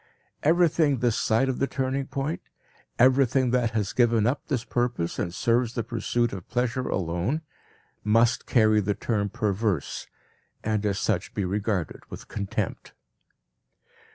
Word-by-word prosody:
Everything 160 Hz, -3 st, +3 dB
this 120 Hz, -2 st, +1 dB
side 115 Hz, +3 st, +2 dB
of 130 Hz, -, -2 dB
the 135 Hz, -, +1 dB
turning 135 Hz, 0 st, -2 dB
point, 140 Hz, +4 st, -3 dB, 0.6 s
everything 130 Hz, 0 st, +4 dB
that 125 Hz, -2 st, +2 dB
has 105 Hz, -4 st, -2 dB
given 115 Hz, -3 st, +3 dB
up 125 Hz, +5 st, -1 dB
this 130 Hz, -6 st, -1 dB
purpose 120 Hz, -9 st, -1 dB
and 85 Hz, -, -1 dB
serves 115 Hz, +5 st, +1 dB
the 115 Hz, -, -1 dB
pursuit 120 Hz, +1 st, -1 dB
of 95 Hz, -3 st, -8 dB
pleasure 125 Hz, +1 st, -1 dB
alone, 90 Hz, -, -1 dB, 0.6 s
must 115 Hz, +3 st, +3 dB
carry 110 Hz, -3 st, +4 dB
the 100 Hz, 0 st, -1 dB
term 105 Hz, -3 st, -1 dB
"perverse" 100 Hz, -4 st, -1 dB, 0.6 s
and 105 Hz, -1 st, 0 dB
as 100 Hz, -1 st, 0 dB
such 100 Hz, -4 st, -1 dB
be 100 Hz, -, 0 dB
regarded 100 Hz, -2 st, -2 dB
with -, -, -9 dB
contempt. 100 Hz, -2 st, -4 dB
115 Hz, 140 wpm, -26 LUFS, 105-130 Hz, 0.6 s, everything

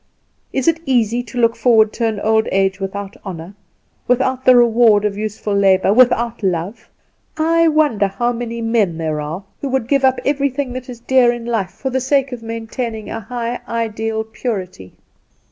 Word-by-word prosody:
Is 265 Hz, -, -2 dB
it 330 Hz, -1 st, +3 dB
easy 240 Hz, -2 st, +1 dB
to 245 Hz, 0 st, -10 dB
look 230 Hz, -1 st, +3 dB
forward 225 Hz, -3 st, +3 dB
to 230 Hz, -, 0 dB
an 215 Hz, -2 st, -2 dB
old 220 Hz, 0 st, +2 dB
age 195 Hz, 0 st, +1 dB
without 195 Hz, 0 st, -5 dB
honour, 175 Hz, -1 st, -7 dB, 0.5 s
without 260 Hz, +1 st, +1 dB
the 255 Hz, -, +7 dB
reward 230 Hz, -3 st, +4 dB
of 205 Hz, -1 st, -1 dB
useful 210 Hz, 0 st, -4 dB
labour, 195 Hz, 0 st, +3 dB
without 240 Hz, -1 st, +3 dB
love? 185 Hz, +2 st, -3 dB, 0.5 s
I 330 Hz, +1 st, +3 dB
wonder 295 Hz, -10 st, +2 dB
how 240 Hz, +5 st, -1 dB
many 235 Hz, -1 st, -5 dB
men 225 Hz, -7 st, +1 dB
there 155 Hz, -2 st, -2 dB
are 160 Hz, +6 st, -5 dB, 0.2 s
who 280 Hz, -, -3 dB
would 260 Hz, -3 st, -1 dB
give 275 Hz, 0 st, +1 dB
up 260 Hz, -1 st, +3 dB
everything 280 Hz, -2 st, -1 dB
that 255 Hz, 0 st, -7 dB
is 240 Hz, -2 st, -9 dB
dear 250 Hz, -1 st, +4 dB
in 240 Hz, -1 st, -6 dB
life 225 Hz, -6 st, -1 dB
for 265 Hz, -, -5 dB
the 260 Hz, 0 st, 0 dB
sake 270 Hz, +1 st, +1 dB
of 245 Hz, -2 st, -6 dB
maintaining 225 Hz, 0 st, -5 dB
a 225 Hz, -, -4 dB
high 235 Hz, +2 st, -4 dB
ideal 225 Hz, -1 st, -2 dB
purity." 190 Hz, -, -6 dB
230 Hz, 180 wpm, -18 LUFS, 205-250 Hz, 0.5 s, the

